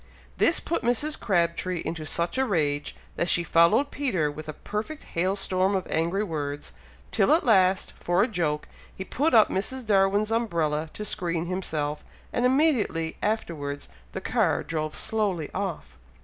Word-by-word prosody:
This 335 Hz, -, +4 dB
put 335 Hz, -, -2 dB
Mrs. 250 Hz, +6 st, 0 dB
Crabtree 175 Hz, -2 st, 0 dB
into 160 Hz, -2 st, -3 dB
such 170 Hz, -, 0 dB
a 265 Hz, -, +3 dB
rage, 145 Hz, -7 st, 0 dB, 0.2 s
that 170 Hz, -, +1 dB
she 175 Hz, -3 st, +3 dB
followed 170 Hz, -, +4 dB
Peter 190 Hz, -, 0 dB
with 155 Hz, +1 st, -8 dB
a -, -, -4 dB
perfect 220 Hz, -, -5 dB
hail 185 Hz, +3 st, -1 dB
storm 190 Hz, 0 st, +1 dB
of 185 Hz, -, -1 dB
angry 170 Hz, +5 st, +1 dB
words, 145 Hz, -6 st, -4 dB, 0.4 s
till 195 Hz, -, +3 dB
at 330 Hz, -, +2 dB
last, 190 Hz, -4 st, +3 dB
for 175 Hz, +3 st, +2 dB
a -, -, +1 dB
joke, 165 Hz, -8 st, -1 dB, 0.3 s
he 190 Hz, -, -5 dB
put 290 Hz, +6 st, +1 dB
up 220 Hz, -, +6 dB
Mrs. 250 Hz, +7 st, -2 dB
Darwin's 205 Hz, +1 st, +3 dB
umbrella 165 Hz, -9 st, 0 dB
to 210 Hz, -, -4 dB
screen 170 Hz, -4 st, -1 dB
himself, 155 Hz, -5 st, -2 dB, 0.3 s
and 245 Hz, +1 st, +3 dB
immediately 250 Hz, -, +1 dB
afterwards 150 Hz, -10 st, -3 dB, 0.2 s
the -, -, -4 dB
car -, -, +1 dB
drove 155 Hz, -1 st, -3 dB
slowly 200 Hz, -8 st, -1 dB
off. 190 Hz, -4 st, -4 dB
185 Hz, 160 wpm, -26 LUFS, 160-220 Hz, 0.4 s, up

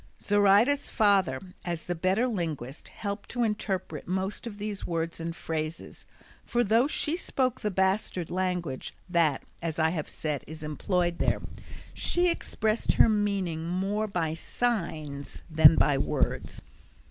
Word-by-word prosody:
Zoraida's 205 Hz, +7 st, +4 dB
father 195 Hz, -, +3 dB, 0.2 s
as 170 Hz, -2 st, -4 dB
the 175 Hz, -, -1 dB
better 185 Hz, +7 st, +1 dB
linguist 160 Hz, -, -3 dB
helped 200 Hz, 0 st, -5 dB
to 245 Hz, 0 st, 0 dB
interpret 210 Hz, -4 st, -2 dB
most 190 Hz, +5 st, -2 dB
of 210 Hz, -3 st, -7 dB
these 205 Hz, -1 st, -4 dB
words 165 Hz, -1 st, -2 dB
and 165 Hz, 0 st, -4 dB
phrases, 160 Hz, -1 st, -5 dB, 0.4 s
for 240 Hz, 0 st, +1 dB
though 230 Hz, +5 st, +4 dB
she 305 Hz, +1 st, 0 dB
spoke 260 Hz, -7 st, -1 dB
the 210 Hz, -, 0 dB
bastard 190 Hz, -2 st, 0 dB
language, 180 Hz, -7 st, -2 dB
that, 165 Hz, -6 st, +2 dB, 0.2 s
as 165 Hz, -2 st, -3 dB
I 160 Hz, 0 st, +3 dB
have 160 Hz, -4 st, -3 dB
said, 150 Hz, -3 st, -3 dB
is 155 Hz, +1 st, -9 dB
employed 175 Hz, +3 st, 0 dB
there, -, -, +2 dB, 0.5 s
she 350 Hz, 0 st, +2 dB
expressed 220 Hz, -8 st, 0 dB
her -, -, +6 dB
meaning 195 Hz, -6 st, 0 dB
more 195 Hz, +4 st, -1 dB
by 170 Hz, -6 st, -1 dB
signs 160 Hz, -9 st, -3 dB
than 160 Hz, 0 st, +8 dB
by 140 Hz, -2 st, +3 dB
words. -, -, -1 dB
185 Hz, 140 wpm, -28 LUFS, 160-210 Hz, 0.5 s, than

